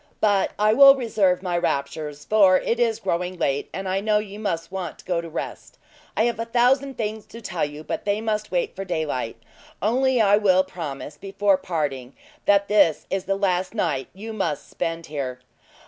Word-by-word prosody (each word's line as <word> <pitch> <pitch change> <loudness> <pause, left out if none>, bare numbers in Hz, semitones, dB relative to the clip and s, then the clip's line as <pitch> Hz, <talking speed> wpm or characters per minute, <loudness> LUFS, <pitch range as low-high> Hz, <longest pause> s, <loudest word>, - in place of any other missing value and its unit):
But 205 -2 +2
I 215 +1 +4
will 275 +3 +9
reserve 205 -8 +1
my 180 -2 -1
raptures, 145 -1 -3
for 195 -4 +5
it 235 +5 -1
is 230 -2 +1
growing 180 0 -2
late, 140 -3 -1
and 190 0 -5
I 190 +1 0
know 210 +1 +2
you 210 -1 -5
must 170 -6 -3
want 185 -4 -5
to - - -17
go 175 -2 0
to 165 - -8
rest. 160 - -6 0.4
I 215 - +4
have 235 -1 0
a 230 - -1
thousand 255 +3 +2
things 215 -1 -4
to 230 - -10
tell 180 -7 -3
you, 150 +1 -4
but - - -4
they 205 0 0
must 215 -1 -2
wait 175 -2 -1
for 195 - -4
daylight; 155 -10 -2 0.4
only 255 +4 +2
I 205 -2 +5
will 190 -3 +4
promise, 150 -5 -7
before 195 +2 +1
parting, 140 -8 -3 0.3
that 200 0 +4
this 200 -7 +3
is 195 -1 -1
the 195 - 0
last 185 0 0
night 150 - -1
you 220 +3 -7
must 165 -9 -2
spend 165 0 -3
here." 135 -4 -4
195 Hz, 195 wpm, -24 LUFS, 165-215 Hz, 0.4 s, will